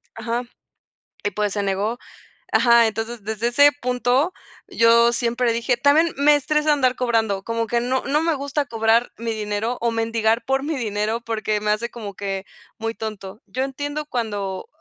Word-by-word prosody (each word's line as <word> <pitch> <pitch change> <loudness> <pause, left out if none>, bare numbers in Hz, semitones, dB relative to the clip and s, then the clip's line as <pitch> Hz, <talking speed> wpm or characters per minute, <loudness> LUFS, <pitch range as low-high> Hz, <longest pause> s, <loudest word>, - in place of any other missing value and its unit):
Ajá. 235 +2 -2 0.8
Y, 205 - +1
pues, 210 0 -1
se 205 - -1
negó. 200 +5 -1 0.5
Ajá, 235 +1 +5
entonces 225 0 -4
desde 220 +2 -2
ese 285 +4 +6
punto, 250 +6 +1 0.4
yo 235 +1 +5
siempre 240 0 0
dije 235 +2 +1
también 300 +6 +3
me 295 +1 +5
estresa 300 +1 +1
andar 255 -3 +2
cobrando, 225 -5 0
como 230 0 -2
que 235 0 0
no 255 +2 -1
no 295 +3 +1
me 330 -2 +1
gusta 285 +1 -2
cobrar 225 0 +2
mi 230 0 -3
dinero 215 +3 -2
o 235 - +2
mendigar 225 0 0
por 270 0 +1
mi 310 +1 -2
dinero, 215 0 -1
porque 215 -2 -2
me 210 0 +1
hace 235 +3 -1
como 210 -4 -8
que 195 -1 -4 0.3
muy 225 0 -2
tonto. 215 -2 -7
Yo 260 +1 -2
entiendo 290 +2 -4
cuando 205 -7 -3
235 Hz, 170 wpm, -22 LUFS, 220-255 Hz, 0.8 s, ese